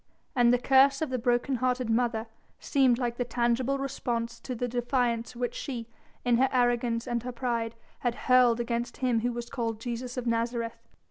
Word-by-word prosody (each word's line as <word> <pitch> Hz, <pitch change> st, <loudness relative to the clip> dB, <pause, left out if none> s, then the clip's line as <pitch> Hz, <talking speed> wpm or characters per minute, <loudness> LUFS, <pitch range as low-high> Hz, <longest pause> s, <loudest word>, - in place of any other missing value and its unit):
And 240 Hz, -2 st, +5 dB
the 245 Hz, -, +4 dB
curse 270 Hz, +3 st, +4 dB
of 300 Hz, -, -3 dB
the 255 Hz, -, -1 dB
broken 245 Hz, +2 st, +1 dB
hearted 250 Hz, 0 st, 0 dB
mother 225 Hz, -1 st, +1 dB, 0.3 s
seemed 260 Hz, -4 st, +3 dB
like 240 Hz, -2 st, -2 dB
the 245 Hz, -, 0 dB
tangible 245 Hz, +3 st, 0 dB
response 240 Hz, -4 st, -3 dB
to 255 Hz, -, -5 dB
the 245 Hz, +1 st, -2 dB
defiance 240 Hz, -1 st, -1 dB
which 245 Hz, 0 st, -2 dB
she, 245 Hz, -5 st, -5 dB, 0.4 s
in 240 Hz, -1 st, +4 dB
her 265 Hz, +2 st, +3 dB
arrogance 240 Hz, -2 st, +1 dB
and 240 Hz, -1 st, -1 dB
her 250 Hz, +2 st, -5 dB
pride, 235 Hz, -2 st, -2 dB, 0.2 s
had 240 Hz, -2 st, -1 dB
hurled 250 Hz, -2 st, +5 dB
against 235 Hz, 0 st, -2 dB
him 250 Hz, -3 st, +1 dB
who 245 Hz, +2 st, 0 dB
was 240 Hz, 0 st, -5 dB
called 230 Hz, -3 st, -2 dB
Jesus 245 Hz, +2 st, -5 dB
of 250 Hz, -, -3 dB
Nazareth. 230 Hz, 0 st, -1 dB
240 Hz, 185 wpm, -28 LUFS, 235-255 Hz, 0.4 s, And